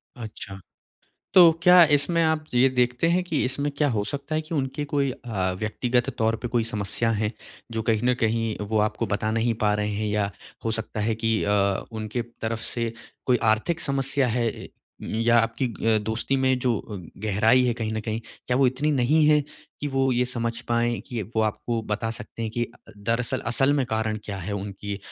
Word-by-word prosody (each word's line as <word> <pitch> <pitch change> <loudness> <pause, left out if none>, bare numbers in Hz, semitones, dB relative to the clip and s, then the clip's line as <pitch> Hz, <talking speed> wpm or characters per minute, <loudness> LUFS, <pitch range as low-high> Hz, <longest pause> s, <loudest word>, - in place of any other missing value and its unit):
अच्छा। 105 -4 -8 0.8
तो 175 -3 +9
क्या 180 -1 +8
इसमें 165 +4 +1
आप 160 -1 +1
ये 130 +2 +5
देखते 125 +3 +1
हैं 175 +2 +2
कि 160 -4 -1
इसमें 140 +3 -1
क्या 145 0 +2
हो 110 -4 0
सकता 140 +6 -4
है 155 - +2
कि 160 +2 -6
उनके 135 +1 -2
कोई 140 -2 0
अ, 100 -7 -2
व्यक्तिगत 120 +4 0
तौर 110 0 +2
पे 120 - -2
कोई 120 -2 +1
समस्या 105 +2 -1
है, 105 0 0 0.4
जो 115 0 -2
कहीं 110 -1 +1
न 125 - +4
कहीं 115 -1 0
वो 110 - +1
आपको 105 +2 0
बता 110 +1 0
नहीं 115 +1 +1
पा 105 - +3
रहे 105 0 -1
हैं? 105 +1 -2
या 105 -1 0 0.3
हो 115 - 0
सकता 110 -1 -3
है 110 +2 +1
कि 110 0 0
अ, 100 -1 +2
उनके 110 +2 -3 0.2
तरफ़ 115 0 -2
से 115 -1 -2 0.3
कोई 125 -1 +4 0.2
आर्थिक 160 +10 -1
समस्या 135 -1 +1
है? 120 +1 0
ए - - -7 0.3
या 115 +2 +2
आपकी 115 +3 +1 0.3
अ, 110 - +5
दोस्ती 110 +5 -1
में 130 -1 +2
जो 125 -2 +1
अ, 105 - -8 0.3
गहराई 110 +5 +4
है, 125 - +2
कहीं 110 -2 -3
न 110 - -2
कहीं 110 +1 -3 0.3
क्या 125 - +1
वो 135 - +4
इतनी 130 +4 0
नहीं 150 +6 +4
है 150 -1 +5 0.4
कि 145 - -2
वो 135 0 +3
ये 125 +1 +2
समझ 115 0 -2
पाएँ 120 0 +1
कि 120 -5 -3
वो - - +4
आपको 115 +2 -1
बता 115 +2 -1
सकते 115 - -8
हैं 110 - -2
कि 120 +2 -1
अ, - - -16 0.2
दरअसल 115 +3 0
असल 135 +3 +3
में - - +1
कारण 110 -1 -1
क्या 100 -2 -5
है 95 +2 -5
उनकी 100 0 -5
115 Hz, 205 wpm, -25 LUFS, 110-130 Hz, 0.8 s, तो